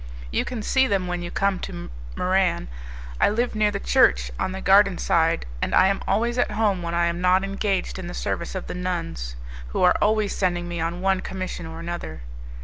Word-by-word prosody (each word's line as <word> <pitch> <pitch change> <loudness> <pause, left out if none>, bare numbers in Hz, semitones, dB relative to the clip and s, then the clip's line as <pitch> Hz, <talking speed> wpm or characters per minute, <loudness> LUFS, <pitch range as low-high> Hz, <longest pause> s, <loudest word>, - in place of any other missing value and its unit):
You - - 0
can 230 -4 -4
see 265 +4 +3
them 195 -4 0
when 180 0 -3
you 175 - -5
come 195 0 0
to 175 - -7 0.2
Muran. 185 - +1 0.5
I - - +5
live 235 +4 0
near 215 -1 +2
the 200 -1 -3
church, 60 - +3
on - - -1
the 190 - -5
garden 195 -1 +5
side, 165 0 +1 0.2
and - - 0
I 190 - +6
am 195 - -1
always 235 +4 +1
at - - +2
home 210 -3 +1
when 170 0 -3
I 170 0 +3
am 170 +1 -1
not 185 +1 +4
engaged 195 -1 -1
in 180 - -6
the 175 - -6
service 170 - -3
of 185 - -4
the - - -5
nuns, 85 - -4 0.3
who - - -1
are 180 - +6
always 215 -1 +2
sending 175 -2 0
me 170 -1 -4
on 170 +2 -2
one 190 0 +2
commission 185 -3 -5
or 160 0 -8
another. 170 - -6
185 Hz, 215 wpm, -24 LUFS, 170-200 Hz, 0.5 s, I